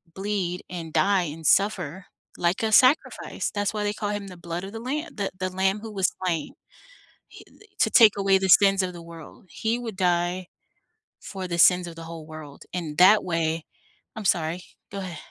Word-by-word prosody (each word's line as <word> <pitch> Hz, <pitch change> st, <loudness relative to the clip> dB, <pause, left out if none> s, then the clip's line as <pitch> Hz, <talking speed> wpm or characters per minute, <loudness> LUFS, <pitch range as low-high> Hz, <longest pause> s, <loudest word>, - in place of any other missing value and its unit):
bleed 190 Hz, -3 st, -2 dB
and 165 Hz, -3 st, -7 dB
die 195 Hz, -2 st, +3 dB
and 160 Hz, -1 st, -5 dB
suffer 190 Hz, -3 st, +1 dB, 0.3 s
like 175 Hz, +4 st, 0 dB
a 220 Hz, -, 0 dB
sacrifice, 255 Hz, +7 st, +3 dB
that's 205 Hz, 0 st, -2 dB
why 210 Hz, -1 st, -2 dB
they 205 Hz, 0 st, -1 dB
call 210 Hz, -1 st, -4 dB
him 205 Hz, -1 st, -4 dB
the 180 Hz, -, -10 dB
blood 170 Hz, +1 st, -5 dB
of 195 Hz, -, -8 dB
the 225 Hz, -, -6 dB
lamb 290 Hz, +7 st, -4 dB
the 200 Hz, -2 st, -2 dB
the 185 Hz, 0 st, -1 dB
lamb 190 Hz, +2 st, 0 dB
who 225 Hz, -1 st, -8 dB
was 190 Hz, -3 st, 0 dB
slain, 165 Hz, -4 st, -2 dB, 0.8 s
he -, -, -14 dB
d -, -, -21 dB
to -, -, +2 dB
take 220 Hz, -4 st, +6 dB
away 195 Hz, -1 st, +3 dB
the 190 Hz, 0 st, -1 dB
sins 195 Hz, +1 st, +5 dB
of 180 Hz, -1 st, -3 dB
the 170 Hz, -1 st, -10 dB
world, 165 Hz, +5 st, -13 dB
he 230 Hz, +1 st, -2 dB
would 225 Hz, -5 st, -6 dB
die 180 Hz, 0 st, 0 dB, 0.8 s
for 190 Hz, -2 st, -6 dB
the 170 Hz, -1 st, -3 dB
sins 180 Hz, 0 st, +5 dB
of 165 Hz, -, -9 dB
the 165 Hz, -, -9 dB
whole 165 Hz, -1 st, -9 dB
world, 155 Hz, -3 st, -11 dB
in 165 Hz, -4 st, -4 dB
that 195 Hz, +4 st, +6 dB
way 165 Hz, -2 st, -1 dB, 0.5 s
I'm 215 Hz, -2 st, -7 dB
sorry, 170 Hz, 0 st, 0 dB, 0.3 s
go 200 Hz, -, -5 dB
ahea 175 Hz, -4 st, -6 dB
185 Hz, 200 wpm, -25 LUFS, 170-205 Hz, 0.8 s, take